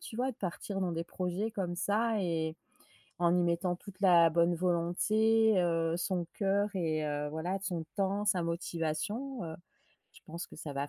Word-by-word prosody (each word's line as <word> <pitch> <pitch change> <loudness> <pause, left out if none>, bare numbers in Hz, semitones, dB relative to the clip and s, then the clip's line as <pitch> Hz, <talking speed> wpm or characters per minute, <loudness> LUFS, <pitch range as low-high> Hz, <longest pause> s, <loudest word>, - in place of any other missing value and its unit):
tu 225 - -9
vois? 260 +2 0
De - - -22
partir 195 +1 -4
dans 180 -2 0
des 165 0 -2
projets 185 +5 -2
comme 185 -5 -3
ça 220 +3 +1
et, 160 -2 -1 0.6
en 175 0 +4
y - - +3
mettant 170 +1 +1
toute 190 +1 -13
la, 170 -3 +7
bonne 170 +2 +3
volonté, 205 +5 +3
heu, 165 -1 +1
son 180 -1 -1
cœur 200 +1 +1
et 160 -4 0
heu, 145 0 -2
voilà, 170 +5 -2
de - - -12
son 170 -4 -3
temps, 200 +1 0
sa 185 -4 +2
motivation, 175 - -2
heu. 160 0 -6 0.6
Je - - -17
pense 170 +2 -6
que - - -13
ça 150 -2 -6
va 140 +1 -2
175 Hz, 185 wpm, -32 LUFS, 165-200 Hz, 0.6 s, la